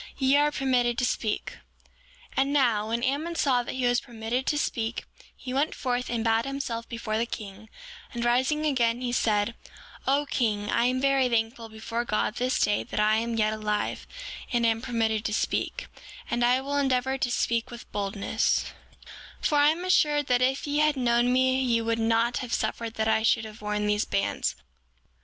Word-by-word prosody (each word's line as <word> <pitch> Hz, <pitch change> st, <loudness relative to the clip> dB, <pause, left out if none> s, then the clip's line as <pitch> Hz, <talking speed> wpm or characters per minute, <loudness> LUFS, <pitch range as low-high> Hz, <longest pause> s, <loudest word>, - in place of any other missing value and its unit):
Ye 265 Hz, 0 st, +3 dB
are 295 Hz, +1 st, +4 dB
permitted 250 Hz, -4 st, +1 dB
to 250 Hz, -, +1 dB
speak. 220 Hz, -3 st, -2 dB, 0.7 s
7:12 -, -, -18 dB
And 275 Hz, +1 st, +2 dB
now, 235 Hz, -7 st, +2 dB
when 230 Hz, +1 st, -2 dB
Ammon 295 Hz, +6 st, -1 dB
saw 265 Hz, -6 st, +2 dB
that 240 Hz, -, -6 dB
he 255 Hz, -1 st, -1 dB
was 245 Hz, 0 st, +2 dB
permitted 235 Hz, +2 st, -4 dB
to 295 Hz, -, +1 dB
speak, 230 Hz, -5 st, -2 dB, 0.3 s
he 255 Hz, -, -6 dB
went 280 Hz, +4 st, 0 dB
forth 250 Hz, -2 st, -2 dB
and 235 Hz, -2 st, -1 dB
bowed 225 Hz, 0 st, +2 dB
himself 270 Hz, -4 st, -4 dB
before 225 Hz, -2 st, -2 dB
the 235 Hz, -, 0 dB
king; 210 Hz, -1 st, -8 dB, 0.4 s
and 240 Hz, 0 st, -3 dB
rising 260 Hz, +6 st, +2 dB
again 240 Hz, -4 st, +1 dB
he 245 Hz, -1 st, -2 dB
said: 215 Hz, -2 st, +1 dB, 0.5 s
O 280 Hz, +2 st, +3 dB
king, 210 Hz, -7 st, -1 dB
I 235 Hz, -, +2 dB
am 255 Hz, +1 st, +1 dB
very 270 Hz, -1 st, +3 dB
thankful 230 Hz, 0 st, -1 dB
before 220 Hz, +2 st, -4 dB
God 215 Hz, -1 st, -1 dB
this 255 Hz, +1 st, 0 dB
day 205 Hz, 0 st, +2 dB
that -, -, -5 dB
I 215 Hz, +1 st, +4 dB
am 230 Hz, +1 st, -1 dB
yet 215 Hz, -1 st, +2 dB
alive, 210 Hz, -1 st, -2 dB, 0.4 s
and 235 Hz, -1 st, +2 dB
am 225 Hz, 0 st, +2 dB
permitted 225 Hz, -3 st, 0 dB
to 210 Hz, -, 0 dB
speak; -, -, -1 dB, 0.5 s
and 240 Hz, -, +1 dB
I 250 Hz, +2 st, +3 dB
will 285 Hz, +1 st, -2 dB
endeavor 265 Hz, -1 st, +1 dB
to 245 Hz, -, 0 dB
speak 235 Hz, -1 st, 0 dB
with 240 Hz, -1 st, -11 dB
boldness; 205 Hz, +2 st, -1 dB, 0.7 s
7:13 -, -, -6 dB
For 300 Hz, -, +2 dB
I 290 Hz, +1 st, +6 dB
am 340 Hz, +4 st, -1 dB
assured 295 Hz, -5 st, +3 dB
that 250 Hz, -1 st, +2 dB
if 265 Hz, +2 st, +1 dB
ye 290 Hz, 0 st, 0 dB
had 305 Hz, -1 st, +3 dB
known 240 Hz, -1 st, +2 dB
me 260 Hz, +1 st, +3 dB
ye 240 Hz, -3 st, +2 dB
would 230 Hz, 0 st, -1 dB
not 230 Hz, +1 st, +2 dB
have 245 Hz, -2 st, -4 dB
suffered 230 Hz, -1 st, -3 dB
that 220 Hz, 0 st, 0 dB
I 220 Hz, 0 st, +3 dB
should 225 Hz, 0 st, +2 dB
have 215 Hz, 0 st, -11 dB
worn 210 Hz, 0 st, -1 dB
these 210 Hz, 0 st, +1 dB
bands. 195 Hz, -, -1 dB
240 Hz, 195 wpm, -27 LUFS, 225-265 Hz, 0.7 s, I